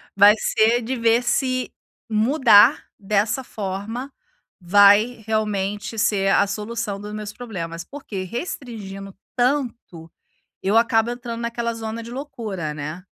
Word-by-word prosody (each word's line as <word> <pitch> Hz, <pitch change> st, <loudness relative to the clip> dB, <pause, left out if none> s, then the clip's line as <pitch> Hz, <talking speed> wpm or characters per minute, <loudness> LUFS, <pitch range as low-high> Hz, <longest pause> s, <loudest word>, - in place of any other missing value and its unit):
vai 205 Hz, +1 st, +8 dB
ser 230 Hz, +3 st, +2 dB
de 255 Hz, +3 st, -3 dB
ver 230 Hz, 0 st, +3 dB
se, 255 Hz, +1 st, 0 dB, 0.4 s
mudar 220 Hz, -1 st, +5 dB
dessa 210 Hz, +5 st, 0 dB
forma 215 Hz, +6 st, -5 dB, 0.5 s
vai 205 Hz, +5 st, +5 dB
realmente 210 Hz, 0 st, -2 dB
ser 200 Hz, -3 st, +2 dB
a -, -, +4 dB
solução 210 Hz, 0 st, -4 dB
dos 210 Hz, 0 st, -7 dB
meus 210 Hz, -1 st, -6 dB
problemas. 170 Hz, -8 st, -6 dB
Porque 215 Hz, -8 st, -7 dB
restringindo, 205 Hz, -, -6 dB, 0.2 s
tanto, 245 Hz, -, -2 dB, 0.5 s
eu 200 Hz, +3 st, +1 dB
acabo 230 Hz, 0 st, +2 dB
entrando 240 Hz, -1 st, -6 dB
naquela 235 Hz, 0 st, -2 dB
zona 225 Hz, 0 st, -5 dB
de 230 Hz, -, -9 dB
loucura, 220 Hz, -, -5 dB
né. 155 Hz, +5 st, -6 dB
220 Hz, 125 wpm, -22 LUFS, 200-240 Hz, 0.5 s, vai